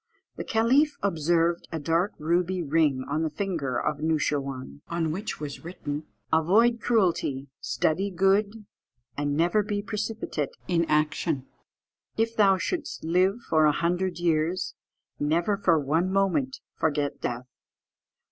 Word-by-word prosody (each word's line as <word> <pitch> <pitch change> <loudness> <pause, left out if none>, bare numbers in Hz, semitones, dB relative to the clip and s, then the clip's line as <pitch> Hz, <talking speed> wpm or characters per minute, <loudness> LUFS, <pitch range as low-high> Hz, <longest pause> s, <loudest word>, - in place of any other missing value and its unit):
The - - -5
caliph 260 +7 +3
observed 170 -1 +1
a 165 - -2
dark 165 +6 +1
ruby 175 +3 0
ring 145 -4 +2
on 150 +2 -1
the 160 - 0
finger 150 -7 -2
of 150 -1 -1
Noosheerwân, 140 - -2
on 165 -2 -1
which 200 +7 -4
was 150 0 -6
written 155 -3 -5 0.3
"Avoid 215 +9 +4
cruelty, 170 - +1
study 190 +6 0
good, 200 +3 +1 0.5
and 145 +1 -1
never 175 +6 +3
be 205 0 -3
precipitate 210 -9 -3
in 170 -2 +2
action. 150 -2 0 0.7
"If 225 +1 0
thou 195 -3 +5
shouldst 315 - -3
live 185 +7 +2
for 155 -1 +4
a 150 - +5
hundred 175 +2 -1
years, 170 +2 0 0.5
never 170 +7 +1
for 180 -5 +3
one 160 +6 +1
moment 195 +8 +1 0.2
forget 145 -2 0
death. 120 +1 -3
170 Hz, 130 wpm, -27 LUFS, 150-200 Hz, 0.7 s, thou